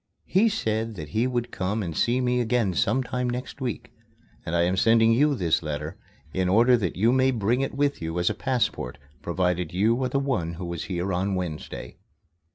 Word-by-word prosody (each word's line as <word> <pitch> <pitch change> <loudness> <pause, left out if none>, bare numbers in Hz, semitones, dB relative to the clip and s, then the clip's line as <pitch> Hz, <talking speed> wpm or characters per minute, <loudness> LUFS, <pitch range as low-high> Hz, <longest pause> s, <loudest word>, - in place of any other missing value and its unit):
He 210 +5 +3
said 110 - -2
that 75 -5 -7
he 110 +9 +1
would 120 -2 -2
come 100 +3 -2
and 85 -4 -5
see 120 +8 +2
me 125 0 +1
again 115 -5 +1
sometime 125 +5 0
next 125 +3 -5
week, 125 -5 -4 0.5
and 80 - -3
I 85 - +3
am 90 +2 +1
sending 115 +3 +4
you 145 +4 +3
this 85 -9 +1
letter 75 -1 -4 0.4
in 95 -1 0
order 120 +6 +5
that 95 -9 -1
you 110 +6 +3
may 130 +1 +3
bring 120 +1 +1
it 135 - -2
with 140 -4 0
you 80 +1 -3
as 90 0 0
a - - +3
passport, 125 - -1 0.2
provided 90 0 -1
you 115 +7 +2
are 130 - 0
the 140 - 0
one 125 -13 -1
who 90 +2 -6
was 85 -1 -4
here 95 0 -2
on 95 +2 0
Wednesday. 75 -8 -5
110 Hz, 200 wpm, -25 LUFS, 90-125 Hz, 0.5 s, order